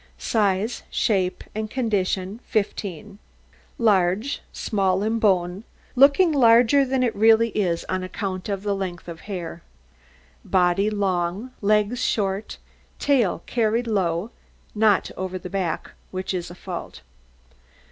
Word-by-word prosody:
SIZE, 210 Hz, +1 st, 0 dB
SHAPE, 190 Hz, -4 st, 0 dB
AND 215 Hz, 0 st, -3 dB
CONDITION 205 Hz, -4 st, -1 dB
15 205 Hz, -1 st, -3 dB, 0.6 s
Large, 205 Hz, +2 st, +2 dB
small 195 Hz, -2 st, 0 dB
in 225 Hz, +1 st, 0 dB
bone, 185 Hz, -2 st, +1 dB, 0.3 s
looking 280 Hz, +7 st, +6 dB
larger 245 Hz, 0 st, +5 dB
than 260 Hz, -1 st, 0 dB
it 240 Hz, -, 0 dB
really 225 Hz, +2 st, +5 dB
is 180 Hz, -6 st, -1 dB
on 185 Hz, -, -1 dB
account 185 Hz, +1 st, -4 dB
of 200 Hz, -1 st, -3 dB
the 205 Hz, -1 st, 0 dB
length 185 Hz, -4 st, -5 dB
of 165 Hz, -1 st, -7 dB
hair. 170 Hz, -3 st, -5 dB, 0.8 s
Body 185 Hz, +2 st, +2 dB
long, 195 Hz, +2 st, -1 dB
legs 210 Hz, +4 st, +2 dB
short, 200 Hz, -2 st, -1 dB, 0.4 s
tail 240 Hz, -, +1 dB
carried 230 Hz, 0 st, 0 dB
low 190 Hz, -2 st, -1 dB, 0.4 s
not 210 Hz, -2 st, +2 dB
over 185 Hz, 0 st, -4 dB
the 180 Hz, 0 st, -9 dB
back, 185 Hz, -5 st, -2 dB, 0.2 s
which 185 Hz, +1 st, -4 dB
is 175 Hz, -2 st, -3 dB
a 175 Hz, -, -10 dB
fault. 175 Hz, -, -7 dB
200 Hz, 125 wpm, -23 LUFS, 185-225 Hz, 0.8 s, looking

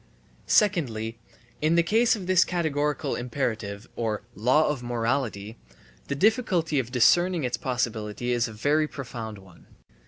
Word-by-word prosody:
Secondly, 120 Hz, -, +1 dB, 0.4 s
in 155 Hz, +2 st, +3 dB
the 170 Hz, -, +4 dB
case 225 Hz, +7 st, +3 dB
of 195 Hz, -4 st, -7 dB
this 185 Hz, 0 st, +5 dB
categorical 150 Hz, -5 st, -1 dB
imperative 115 Hz, -4 st, -3 dB
or 110 Hz, -3 st, -2 dB
law 130 Hz, +9 st, +3 dB
of 150 Hz, -4 st, -2 dB
morality, 115 Hz, -3 st, -2 dB, 0.5 s
the 140 Hz, -, -2 dB
difficulty 180 Hz, -, +2 dB
(of 125 Hz, -2 st, -4 dB
discerning 175 Hz, +7 st, +3 dB
its 125 Hz, -1 st, 0 dB
possibility) 115 Hz, -1 st, -2 dB
is 120 Hz, -1 st, +1 dB
a -, -, -8 dB
very 145 Hz, +8 st, +1 dB
profound 115 Hz, -6 st, -7 dB
one. 95 Hz, -3 st, -17 dB
125 Hz, 135 wpm, -26 LUFS, 115-160 Hz, 0.5 s, this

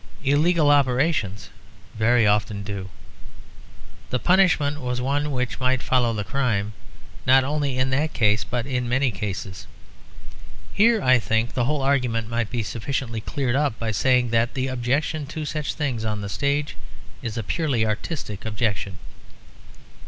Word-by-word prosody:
Illegal 150 Hz, +2 st, +3 dB
operations 130 Hz, -, +1 dB, 0.4 s
very 115 Hz, +1 st, +3 dB
often 105 Hz, -1 st, +1 dB
do. 100 Hz, -2 st, -5 dB, 1.2 s
The 125 Hz, -, 0 dB
punishment 160 Hz, -4 st, +3 dB
was 125 Hz, 0 st, -2 dB
one 145 Hz, +4 st, 0 dB
which 125 Hz, -3 st, -2 dB
might 130 Hz, 0 st, +1 dB
follow 125 Hz, -2 st, +2 dB
the 105 Hz, -2 st, -2 dB
crime, 110 Hz, -5 st, -1 dB, 0.5 s
not 130 Hz, +1 st, +6 dB
only 140 Hz, -1 st, -1 dB
in 130 Hz, +1 st, +1 dB
that 150 Hz, +4 st, +1 dB
case, 105 Hz, -2 st, +2 dB
but 120 Hz, +3 st, -3 dB
in 125 Hz, -3 st, -2 dB
many 130 Hz, +1 st, +2 dB
cases. 95 Hz, -2 st, -5 dB, 1.1 s
Here, 225 Hz, 0 st, +4 dB
I 130 Hz, -1 st, +5 dB
think, 110 Hz, +2 st, 0 dB
the 125 Hz, -, 0 dB
whole 145 Hz, +1 st, 0 dB
argument 125 Hz, -5 st, +1 dB
might 115 Hz, -2 st, -1 dB
be 120 Hz, -2 st, -2 dB
sufficiently 115 Hz, 0 st, -3 dB
cleared 130 Hz, +2 st, -1 dB
up 140 Hz, -5 st, +1 dB
by 115 Hz, -1 st, -2 dB
saying 125 Hz, +3 st, +2 dB
that 115 Hz, +2 st, +1 dB
the 130 Hz, 0 st, -1 dB
objection 140 Hz, +4 st, -1 dB
to 155 Hz, +1 st, -5 dB
such 150 Hz, 0 st, -3 dB
things 130 Hz, -7 st, -2 dB
on 105 Hz, -1 st, -2 dB
the 100 Hz, -, -5 dB
stage 140 Hz, +6 st, -1 dB, 0.5 s
is 115 Hz, -2 st, -5 dB
a 115 Hz, -, -2 dB
purely 135 Hz, -, 0 dB
artistic 110 Hz, -, -4 dB
objection. 105 Hz, -4 st, -2 dB
125 Hz, 150 wpm, -23 LUFS, 110-140 Hz, 1.2 s, not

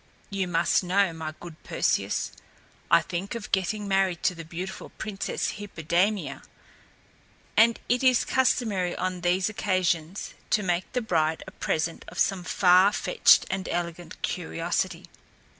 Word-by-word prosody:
You 195 Hz, -2 st, -1 dB
must 175 Hz, +2 st, +2 dB
know, 185 Hz, 0 st, +2 dB
my 155 Hz, -1 st, -6 dB
good 170 Hz, -3 st, -11 dB
Perseus, -, -, 0 dB, 0.6 s
I -, -, +6 dB
think 185 Hz, +5 st, -4 dB
of 230 Hz, -2 st, -7 dB
getting 195 Hz, +2 st, 0 dB
married 195 Hz, -3 st, +1 dB
to -, -, +3 dB
the 165 Hz, -1 st, -8 dB
beautiful 175 Hz, +4 st, -7 dB
Princess 205 Hz, -2 st, -3 dB
Hippodamia, 190 Hz, +1 st, -1 dB, 1.1 s
and 230 Hz, +1 st, +5 dB
it 245 Hz, +2 st, +1 dB
is 255 Hz, -2 st, +4 dB
customary 215 Hz, -8 st, +1 dB
on 185 Hz, -1 st, -3 dB
these 180 Hz, +2 st, +2 dB
occasions 185 Hz, -4 st, -1 dB, 0.2 s
to 210 Hz, -, +2 dB
make 180 Hz, 0 st, -1 dB
the 250 Hz, -, 0 dB
bride 160 Hz, -7 st, 0 dB
a -, -, -10 dB
present 160 Hz, +1 st, -2 dB
of 175 Hz, -, -11 dB
some 190 Hz, 0 st, +1 dB
far 185 Hz, +2 st, +5 dB
fetched -, -, +4 dB
and 190 Hz, 0 st, -3 dB
elegant 170 Hz, -1 st, -4 dB
curiosity. 175 Hz, +1 st, -2 dB
185 Hz, 140 wpm, -26 LUFS, 170-200 Hz, 1.1 s, I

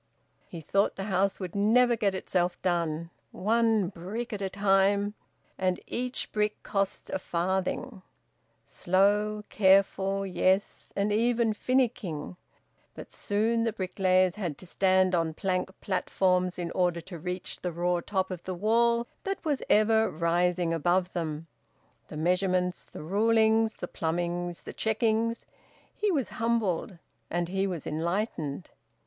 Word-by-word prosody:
He 170 Hz, -, -8 dB
thought 195 Hz, +6 st, +1 dB
the 195 Hz, -, -4 dB
house 195 Hz, 0 st, 0 dB
would 185 Hz, -3 st, -5 dB
never 235 Hz, +4 st, +4 dB
get 200 Hz, -4 st, 0 dB
itself 180 Hz, -1 st, -1 dB
done 170 Hz, -2 st, -1 dB, 0.2 s
one 220 Hz, -1 st, +2 dB
brick 205 Hz, +7 st, -5 dB
at 205 Hz, -, -4 dB
a 195 Hz, -, -1 dB
time 200 Hz, +1 st, +2 dB, 0.5 s
and 185 Hz, -1 st, +1 dB
each 250 Hz, +1 st, -4 dB
brick 210 Hz, 0 st, -1 dB
cost 195 Hz, -2 st, -2 dB
a -, -, -1 dB
farthing 190 Hz, +6 st, -2 dB, 0.6 s
slow, 205 Hz, +3 st, +1 dB
careful; 195 Hz, 0 st, +3 dB
yes, 190 Hz, +1 st, 0 dB
and 200 Hz, +1 st, +1 dB
even 230 Hz, 0 st, +2 dB
finicking. 220 Hz, -, -1 dB, 0.6 s
But -, -, -10 dB
soon 225 Hz, +3 st, 0 dB
the 225 Hz, -, +1 dB
bricklayers 185 Hz, -2 st, +2 dB
had 175 Hz, -9 st, -4 dB
to -, -, -11 dB
stand 185 Hz, +1 st, +2 dB
on 165 Hz, -2 st, 0 dB
plank 185 Hz, 0 st, -1 dB
platforms 185 Hz, -1 st, +1 dB
in 170 Hz, -1 st, -3 dB
order 175 Hz, -2 st, +1 dB
to 170 Hz, 0 st, -9 dB
reach 180 Hz, +2 st, -5 dB
the 180 Hz, -, -2 dB
raw 175 Hz, +1 st, 0 dB
top 190 Hz, -2 st, -1 dB
of 180 Hz, -2 st, -5 dB
the 185 Hz, +1 st, -5 dB
wall 235 Hz, +4 st, +2 dB, 0.2 s
that 390 Hz, -2 st, -4 dB
was 290 Hz, -4 st, 0 dB
ever 220 Hz, +1 st, +4 dB
rising 170 Hz, +1 st, +1 dB
above 175 Hz, +3 st, +1 dB
them. 160 Hz, -2 st, -3 dB, 0.6 s
The -, -, -8 dB
measurements, 180 Hz, +2 st, 0 dB
the -, -, -10 dB
rulings, 220 Hz, +4 st, +3 dB
the 175 Hz, -, -6 dB
plumbings, 175 Hz, +1 st, -3 dB
the -, -, -8 dB
checkings! 225 Hz, +1 st, 0 dB, 0.5 s
He 420 Hz, -, 0 dB
was 280 Hz, -8 st, 0 dB
humbled 220 Hz, -5 st, 0 dB, 0.3 s
and 175 Hz, 0 st, -1 dB
he 195 Hz, +1 st, 0 dB
was 175 Hz, -6 st, -4 dB
enlightened. 170 Hz, -1 st, -2 dB
190 Hz, 140 wpm, -28 LUFS, 175-215 Hz, 0.6 s, never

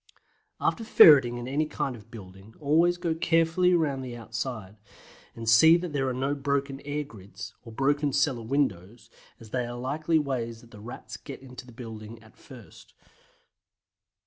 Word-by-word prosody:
After 230 Hz, -, 0 dB
ferreting 140 Hz, -, +7 dB
in 120 Hz, 0 st, -6 dB
any 150 Hz, +4 st, 0 dB
kind 135 Hz, -4 st, -3 dB
of 110 Hz, -1 st, -15 dB
building, 100 Hz, -1 st, -13 dB
always 165 Hz, +4 st, +3 dB
go 170 Hz, -2 st, -1 dB
carefully 165 Hz, +2 st, +2 dB
round 145 Hz, -5 st, 0 dB
the 120 Hz, -2 st, -7 dB
outside, 110 Hz, -3 st, -6 dB, 0.6 s
and 115 Hz, -1 st, -7 dB
see 160 Hz, +10 st, +7 dB
that 175 Hz, -3 st, -5 dB
there 135 Hz, -2 st, 0 dB
are -, -, -1 dB
no 135 Hz, +3 st, -1 dB
broken 140 Hz, -1 st, -2 dB
air 145 Hz, +1 st, -3 dB
grids, 110 Hz, -3 st, -11 dB
or 115 Hz, -, -12 dB
broken 145 Hz, +4 st, +1 dB
cellar 135 Hz, -3 st, +1 dB
windows, 115 Hz, -4 st, -2 dB, 0.3 s
as 110 Hz, -2 st, -14 dB
these 125 Hz, -, 0 dB
are 120 Hz, -, -6 dB
likely 150 Hz, +6 st, 0 dB
ways 120 Hz, -6 st, -3 dB
that 120 Hz, -, -19 dB
the 105 Hz, -3 st, -12 dB
Rats 120 Hz, +3 st, -9 dB
get 135 Hz, -2 st, -10 dB
into 125 Hz, -1 st, -11 dB
the -, -, -12 dB
building 115 Hz, -2 st, -9 dB
at 110 Hz, -, -19 dB
first. 125 Hz, -7 st, -15 dB
130 Hz, 170 wpm, -27 LUFS, 115-145 Hz, 0.6 s, ferreting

